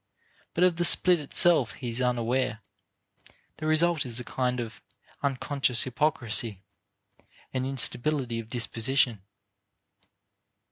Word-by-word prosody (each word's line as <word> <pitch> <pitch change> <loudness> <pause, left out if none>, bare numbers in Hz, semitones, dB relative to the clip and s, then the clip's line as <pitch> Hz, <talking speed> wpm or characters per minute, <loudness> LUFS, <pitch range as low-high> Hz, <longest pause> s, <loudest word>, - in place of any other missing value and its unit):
But 175 - +2
of 180 -2 +3
the 175 - 0
split 175 0 +5
itself 150 -1 +3
he 125 -3 -6
is 120 +3 -4
unaware; 125 -1 -1 1.0
the 155 - -5
result 160 0 +2
is 120 -2 -2
a - - -5
kind 125 +1 -2
of 115 -2 -7 0.4
unconscious 135 -2 0
hypocrisy, 120 -6 -1 0.9
an 130 -1 -2
instability 135 -1 0
of 110 -1 -9
disposition. 120 -1 0
130 Hz, 110 wpm, -27 LUFS, 120-150 Hz, 1.0 s, split